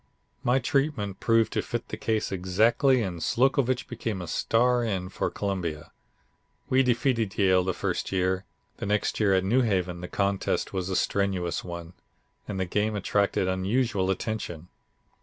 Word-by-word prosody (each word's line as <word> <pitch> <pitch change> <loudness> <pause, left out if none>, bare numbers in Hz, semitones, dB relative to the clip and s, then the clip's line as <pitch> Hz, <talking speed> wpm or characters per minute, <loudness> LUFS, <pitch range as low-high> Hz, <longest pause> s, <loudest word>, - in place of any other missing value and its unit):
My 125 +2 +3
treatment 135 -7 0
proved 115 -2 +2
to - - +1
fit - - -5
the - - -3
case 110 -1 -1
exactly 110 - +3
and 90 -4 -4
Slocovitch 130 - +2
became 115 -4 -4
a 90 - -5
star 120 +8 +2
end 95 -4 -2
for - - -1
Columbia. 90 -7 -3 0.8
We 130 +1 +5
defeated 120 -4 +1
Yale 95 -2 +4
the 95 0 -1
first 90 -3 -2
year; 95 0 0 0.3
the - - -4
next 105 0 0
year 100 -3 +4
at 95 - +2
New 120 +7 +3
Haven 90 -6 0
the 90 - -5
contest 100 0 -1
was 95 -1 -2
a 95 - -1
strenuous 95 -4 0
one, 85 -1 -7 0.5
and 100 -2 -4
the 95 - 0
game 105 +4 0
attracted 100 -1 +1
unusual 95 +1 0
attention. 95 -4 -3
100 Hz, 160 wpm, -27 LUFS, 95-115 Hz, 0.8 s, We